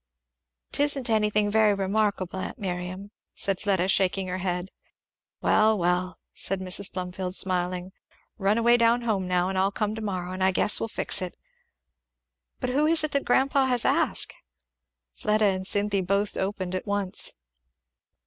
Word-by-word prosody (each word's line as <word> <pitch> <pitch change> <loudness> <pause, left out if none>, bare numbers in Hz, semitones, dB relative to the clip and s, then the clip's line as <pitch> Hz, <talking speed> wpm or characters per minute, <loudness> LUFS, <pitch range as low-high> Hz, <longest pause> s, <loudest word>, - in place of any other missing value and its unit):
"'Tisn't 280 -4 +2
anything 210 -1 +2
very 215 -1 +4
remarkable, 195 -1 -1
aunt - - -5
Miriam," 185 +1 -5 0.2
said 195 -2 -1
Fleda 190 -3 +1
shaking 190 0 +2
her 185 +1 -3
head. 180 0 -3 0.7
"Well, 215 0 +4
well," 180 0 -1 0.2
said 195 0 -1
Mrs. 190 +1 0
Plumfield 185 0 -5
smiling, 180 -1 -1 0.5
"run 200 +2 +2
away 235 +1 +4
down 235 +1 +3
home 200 -5 -1
now, 180 0 +1
and 190 0 -1
I'll 190 +1 +2
come 210 +1 -2
to 220 - -6
morrow, 185 -4 -4
and 185 0 -3
I 190 - +4
guess 205 - +3
we'll 225 - -2
fix - - +2
it. 180 -1 -5 1.2
But 250 - -2
who 295 +4 +2
is 320 -1 +4
it 310 - -2
that 280 - -1
grandpa 270 +1 +2
has 245 -2 +2
asked?" - - +1 0.8
Fleda 215 0 +1
and 190 -1 +1
Cynthy 205 -1 +1
both 200 +2 0
opened 190 -2 -3
at 185 - -4
once. 200 -2 -1
195 Hz, 160 wpm, -26 LUFS, 185-215 Hz, 1.2 s, very